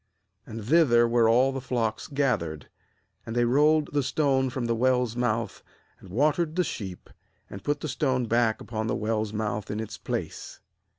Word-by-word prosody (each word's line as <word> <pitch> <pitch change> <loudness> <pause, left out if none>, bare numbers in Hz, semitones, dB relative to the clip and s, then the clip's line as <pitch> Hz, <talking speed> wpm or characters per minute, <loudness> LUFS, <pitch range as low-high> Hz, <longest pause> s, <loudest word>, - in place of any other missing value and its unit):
3 - - -11
And 110 -2 -6
thither 120 -5 +5
were 115 -1 +3
all 125 +4 +4
the 135 0 -4
flocks 115 -4 -2
gath 135 -6 +1
ered; 80 -3 -6 0.6
and 115 - -6
they 120 0 +3
rolled 150 +5 +3
the 145 - +2
stone 135 -1 +1
from 125 -1 -3
the 115 - +1
well's 125 0 +1
mouth, 115 -3 -1 0.4
and 95 - -14
watered 155 - +1
the 180 - +2
sheep, 95 - -6 0.4
and 100 -1 -8
put 145 0 -1
the - - -3
stone 130 -3 0
back 115 -1 +1
upon 110 -1 -4
the - - 0
well's 110 -1 -1
mouth 105 -1 -3
in 105 - -3
its 110 - -6
place. - - -5
120 Hz, 185 wpm, -26 LUFS, 110-135 Hz, 0.6 s, thither